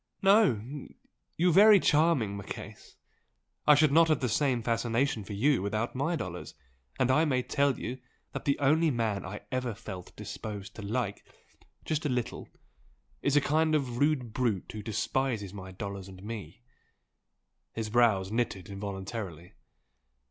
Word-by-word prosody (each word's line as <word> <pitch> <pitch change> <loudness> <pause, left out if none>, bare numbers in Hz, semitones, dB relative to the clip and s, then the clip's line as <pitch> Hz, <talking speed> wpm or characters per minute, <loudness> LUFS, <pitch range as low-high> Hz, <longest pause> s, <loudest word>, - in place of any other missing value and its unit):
No, 145 - +3 0.5
you 175 +1 +3
very 205 +2 +8
charming 150 - +2
Marchese! 100 - -8 0.7
I 150 - +9
should 150 0 +4
not 165 +2 +6
have 155 -3 +2
the 130 - 0
same 125 0 +1
fascination 115 0 0
for 105 - -7
you 130 +4 +2
without 110 +4 -2
my 145 +7 0
dollars! 90 - -6 0.4
and 130 0 +2
I 155 +4 +4
may 130 -5 +1
tell 140 0 +1
you 130 +2 -5 0.3
that - - -5
the 140 - +2
only 155 +4 +3
man 115 -6 -1
I 105 +2 -7
ever 125 -3 -2
felt 95 -5 -9
disposed 105 -3 -7
to - - -6
like, 105 0 -2 0.6
just 155 -1 -1
a 150 - 0
little, 125 -2 -3 0.7
is 140 - +1
a 145 - +6
kind 155 +2 +2
of 125 -5 -1
rude 140 -6 +1
brute 115 -7 -1
who 110 - -6
despises 110 -1 -2
my 95 -2 -8
dollars 100 0 -6
and 95 0 -12
me!" 105 -1 -7 1.1
His 110 -2 -4
brows 105 -5 +3
knitted 110 -6 -2
involuntarily. 95 -3 -6
120 Hz, 150 wpm, -29 LUFS, 100-140 Hz, 1.1 s, I